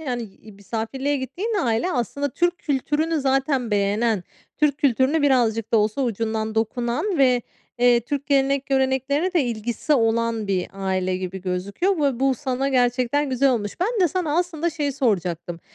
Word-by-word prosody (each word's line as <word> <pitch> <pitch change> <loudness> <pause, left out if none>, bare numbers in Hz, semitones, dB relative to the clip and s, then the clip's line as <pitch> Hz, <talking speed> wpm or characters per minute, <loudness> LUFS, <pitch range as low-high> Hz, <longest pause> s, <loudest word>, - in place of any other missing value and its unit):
yani, 250 -6 -3
iii, 215 0 -13
misafirliğe 225 +8 -3
gittiğin 345 - -3
aile 235 +9 0
aslında 280 +3 -1
Türk 350 +6 0
kültürünü 295 +3 0
zaten 270 -3 +1
beğenen, 205 +1 +1 0.3
Türk 300 -1 +2
kültürüne 280 +3 +2
birazcık 230 -6 +2
da 230 - +5
olsa 215 +5 +1
ucundan 220 -2 -2
dokunan 240 - -1
ve, 250 -3 +4 0.4
eee, 245 -1 +5
Türk 280 +4 -4
gelenek 275 -1 +2
göreneklerine 270 +5 +1
de 340 -6 +3
ilgisi 240 +5 -2
olan 230 -2 +1
bir 190 -2 0
aile 190 -1 -1
gibi 185 0 -5
gözüküyor 195 - -1
ve 275 -5 0
bu 270 -1 +3
sana 265 +1 -2
gerçekten 255 +2 +1
güzel 265 +1 +3
olmuş. 205 -5 -2
Ben 435 +4 0
de 360 - +4
sana 320 -2 -1
aslında 340 -1 -1
şeyi 295 -3 -2
soracaktım. 175 - -1
255 Hz, 155 wpm, -23 LUFS, 220-285 Hz, 0.4 s, da